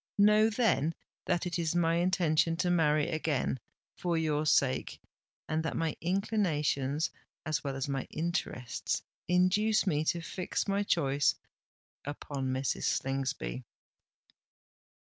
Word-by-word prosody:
Know, 210 +2 +6
then, 195 - +1 0.3
that 175 0 0
it 175 0 -2
is 165 0 0
my 165 -1 +3
intention 165 -2 +2
to 180 0 +1
marry 155 -3 +3
again—for 155 +2 -2
your 155 -1 0
sake—and 150 +3 -1
that 160 - -3
my 165 -2 -1
inclinations, 160 -7 0 0.3
as 155 -1 -1
well 140 -2 -3
as 135 0 -2
my 135 -1 -2
interests, 155 -7 -2 0.2
induce 195 +5 +3
me 150 -5 +1
to 170 - +1
fix 180 +4 -3
my 200 0 +1
choice 145 -8 +2 0.7
upon 145 -1 -4
Mrs. 130 +1 -1
Slingsby." 130 - -1
160 Hz, 115 wpm, -31 LUFS, 145-180 Hz, 0.7 s, Know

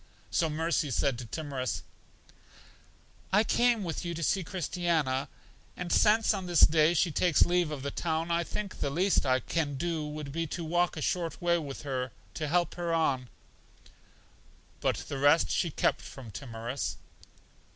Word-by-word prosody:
So 165 - +2
Mercy 160 0 0
said 130 0 0
to 120 - -7
Timorous: 140 -3 -3 1.5
I 205 +3 +5
came 235 -1 +2
with 165 -3 -3
you 170 -1 -3
to 170 - -4
see 190 +4 +1
Christiana, 165 -6 -1 0.5
and 180 -1 -4
since 220 +1 +4
on 190 -3 -4
this 175 -3 +3
day 155 +2 +6
she 170 +1 +2
takes 170 +1 +4
leave 175 -2 +2
of 145 -3 -5
the 140 - -2
town, 165 0 -1
I 170 0 +2
think 200 +3 -5
the - - 0
least 175 0 +2
I 130 0 +3
can 145 +1 -2
do 165 +1 -2
would 150 -1 -6
be 165 +2 -2
to 170 +2 -4
walk 175 +1 +1
a 155 - -3
short 170 -2 -1
way 170 -1 +2
with 140 -3 -7
her 130 -3 -2 0.2
to 155 - -3
help 175 +1 +1
her 170 -1 -1
on. 140 -7 +1 1.5
But - - +1
the 140 - -4
rest 145 +4 +4
she 170 - +1
kept - - +1
from 125 -5 -10
Timorous. 115 +4 -4
160 Hz, 170 wpm, -30 LUFS, 140-175 Hz, 1.5 s, day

